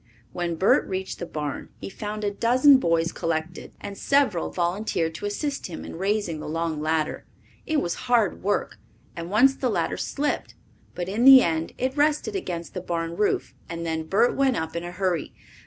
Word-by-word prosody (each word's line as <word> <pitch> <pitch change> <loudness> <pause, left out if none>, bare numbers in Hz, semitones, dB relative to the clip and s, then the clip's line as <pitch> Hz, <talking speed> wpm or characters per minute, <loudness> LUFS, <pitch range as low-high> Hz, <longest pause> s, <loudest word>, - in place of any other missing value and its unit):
When 175 -1 -2
Bert 190 +5 +3
reached 190 0 -4
the 175 - -5
barn 150 -3 -5
he - - -6
found 210 +2 -5
a 205 - 0
dozen 255 +6 +5
boys 165 -5 +1
collected, 165 +1 -3
and 200 -1 -7
several 265 -8 +1
volunteered 175 -2 -1
to 205 +5 -4
assist 280 +7 -3
him 175 - -7
in - - -8
raising 195 -3 -1
the 150 - -6
long 165 -1 -2
ladder. 155 0 -1 0.4
It 310 -2 +1
was 175 - -4
hard 230 -5 +2
work, 205 +2 -1 0.4
and 170 -1 -6
once 245 +7 +5
the 260 -2 -1
ladder 215 - -1
slipped, 290 +1 -2 0.4
but 175 -1 -3
in 210 +5 -1
the 265 -1 +10
end 160 -1 -1
it 260 +1 -1
rested 300 +8 +1
against 175 - -4
the 180 - -4
barn 170 -1 -3
roof 210 +3 0 0.2
and 170 0 -5
then 160 -1 -2
Bert 225 +8 +3
went 270 -3 +2
up 160 0 -4
in 170 - -3
a 175 - -5
hurry. 180 -3 -2
185 Hz, 190 wpm, -25 LUFS, 165-235 Hz, 0.4 s, the